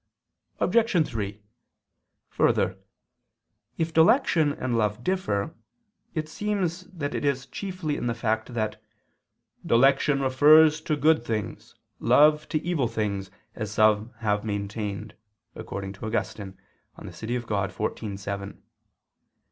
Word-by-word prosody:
Obj. 220 Hz, -8 st, +2 dB
3: 105 Hz, -2 st, -5 dB, 0.9 s
Further, -, -, +1 dB, 1.0 s
if 165 Hz, 0 st, -1 dB
dilection 160 Hz, -, +4 dB
and 130 Hz, -4 st, -2 dB
love 105 Hz, +1 st, 0 dB
differ, 155 Hz, -, -1 dB, 0.6 s
it 155 Hz, -1 st, -2 dB
seems 185 Hz, -1 st, -2 dB
that 160 Hz, -7 st, -5 dB
it -, -, -3 dB
is 140 Hz, -2 st, 0 dB
chiefly 185 Hz, -7 st, -4 dB
in -, -, -3 dB
the 120 Hz, -, -1 dB
fact 110 Hz, +1 st, -2 dB
that 110 Hz, -1 st, -2 dB, 0.8 s
"dilection 135 Hz, +3 st, +3 dB
refers 150 Hz, +4 st, +6 dB
to 155 Hz, -, -1 dB
good 150 Hz, -3 st, +3 dB
things, 110 Hz, -3 st, -4 dB, 0.2 s
love 150 Hz, +1 st, +4 dB
to 155 Hz, -, +1 dB
evil 165 Hz, -8 st, 0 dB
things, 100 Hz, -3 st, -3 dB, 0.2 s
as 110 Hz, -2 st, -5 dB
some 110 Hz, +1 st, +3 dB
have 105 Hz, -2 st, 0 dB
maintained," 105 Hz, 0 st, -4 dB, 0.4 s
according 95 Hz, -1 st, -6 dB
to 100 Hz, +3 st, -7 dB
Augustine 100 Hz, -3 st, -3 dB, 0.4 s
(De -, -, -9 dB
Civ. 120 Hz, +2 st, -4 dB
Dei 100 Hz, -4 st, 0 dB
xiv, 105 Hz, -1 st, -4 dB
7). 100 Hz, 0 st, -6 dB
120 Hz, 120 wpm, -26 LUFS, 105-155 Hz, 1.0 s, refers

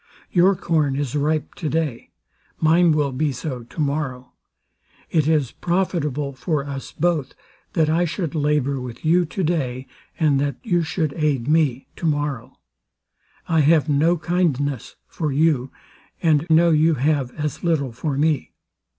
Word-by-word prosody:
Your 185 Hz, +2 st, +4 dB
corn 155 Hz, -6 st, 0 dB
is 140 Hz, -2 st, -2 dB
ripe 150 Hz, +1 st, 0 dB
to 155 Hz, -, -4 dB
day; 150 Hz, -7 st, -2 dB, 0.5 s
mine 165 Hz, +2 st, +4 dB
will 150 Hz, -2 st, +1 dB
be 145 Hz, +3 st, 0 dB
so 125 Hz, 0 st, -5 dB
tomorrow. 135 Hz, -1 st, -3 dB, 0.8 s
It 155 Hz, -3 st, +2 dB
is 150 Hz, -6 st, +2 dB
profitable 150 Hz, -6 st, -1 dB
for 140 Hz, +3 st, -2 dB
us 140 Hz, -2 st, -6 dB
both, 160 Hz, -5 st, -1 dB, 0.4 s
that 160 Hz, -3 st, +2 dB
I 165 Hz, +3 st, +2 dB
should 165 Hz, -2 st, -3 dB
labour 145 Hz, -3 st, 0 dB
with 125 Hz, +3 st, -8 dB
you 175 Hz, +2 st, +4 dB
to 190 Hz, +3 st, -3 dB
day, 135 Hz, -6 st, -1 dB, 0.3 s
and 150 Hz, -4 st, +3 dB
that 140 Hz, 0 st, -1 dB
you 175 Hz, -7 st, +1 dB
should 160 Hz, -2 st, -2 dB
aid 145 Hz, -6 st, 0 dB
me 150 Hz, -5 st, +1 dB
to 170 Hz, -, -2 dB
morrow. 145 Hz, -5 st, -2 dB, 0.9 s
I 165 Hz, -, +2 dB
have 155 Hz, +1 st, +4 dB
no 160 Hz, +5 st, +3 dB
kindness 150 Hz, -7 st, -1 dB
for 155 Hz, -3 st, -3 dB
you, 140 Hz, -3 st, +1 dB, 0.5 s
and 160 Hz, -1 st, +2 dB
know 165 Hz, +1 st, +5 dB
you 160 Hz, +1 st, +4 dB
have 140 Hz, -1 st, +1 dB
as 150 Hz, -1 st, -3 dB
little 155 Hz, -7 st, +1 dB
for 135 Hz, +4 st, -3 dB
me. 150 Hz, -1 st, 0 dB
150 Hz, 150 wpm, -22 LUFS, 140-165 Hz, 0.9 s, know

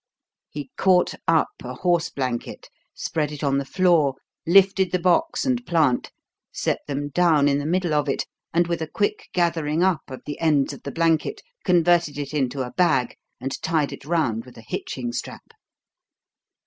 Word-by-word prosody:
He 145 Hz, -3 st, -7 dB
caught 185 Hz, -2 st, +3 dB
up 165 Hz, -1 st, +3 dB
a 125 Hz, 0 st, -6 dB
horse 175 Hz, +2 st, +1 dB
blanket, 125 Hz, -3 st, -4 dB, 0.3 s
spread 150 Hz, -2 st, -2 dB
it 150 Hz, -1 st, -7 dB
on 140 Hz, -1 st, +2 dB
the -, -, -2 dB
floor, 165 Hz, -5 st, +3 dB, 0.3 s
lifted 190 Hz, 0 st, +5 dB
the 180 Hz, -, +2 dB
box 185 Hz, -, +1 dB
and 250 Hz, -2 st, 0 dB
plant, 160 Hz, -, +1 dB, 0.4 s
set -, -, -1 dB
them 145 Hz, 0 st, -3 dB
down 155 Hz, -2 st, +3 dB
in 140 Hz, 0 st, +2 dB
the 145 Hz, -, -3 dB
middle 175 Hz, -1 st, 0 dB
of 150 Hz, -1 st, +1 dB
it, -, -, -1 dB, 0.3 s
and 175 Hz, +1 st, +3 dB
with 170 Hz, -1 st, -2 dB
a 160 Hz, -, -2 dB
quick 205 Hz, +6 st, -2 dB
gathering 165 Hz, -2 st, +1 dB
up 185 Hz, -4 st, +2 dB
of 130 Hz, -, -8 dB
the 145 Hz, -, -6 dB
ends 150 Hz, -4 st, +2 dB
of -, -, -11 dB
the 140 Hz, -, -6 dB
blanket 165 Hz, -2 st, 0 dB, 0.2 s
converted 175 Hz, -4 st, +3 dB
it 145 Hz, 0 st, -5 dB
into 135 Hz, -2 st, -1 dB
a 125 Hz, -, -6 dB
bag 135 Hz, -9 st, +2 dB, 0.2 s
and 135 Hz, +2 st, -4 dB
tied 160 Hz, -3 st, 0 dB
it -, -, -10 dB
round 145 Hz, -8 st, 0 dB
with 125 Hz, -, -15 dB
a 115 Hz, -, -13 dB
hitching 120 Hz, -2 st, -4 dB
strap. -, -, -7 dB
155 Hz, 175 wpm, -23 LUFS, 140-175 Hz, 0.4 s, lifted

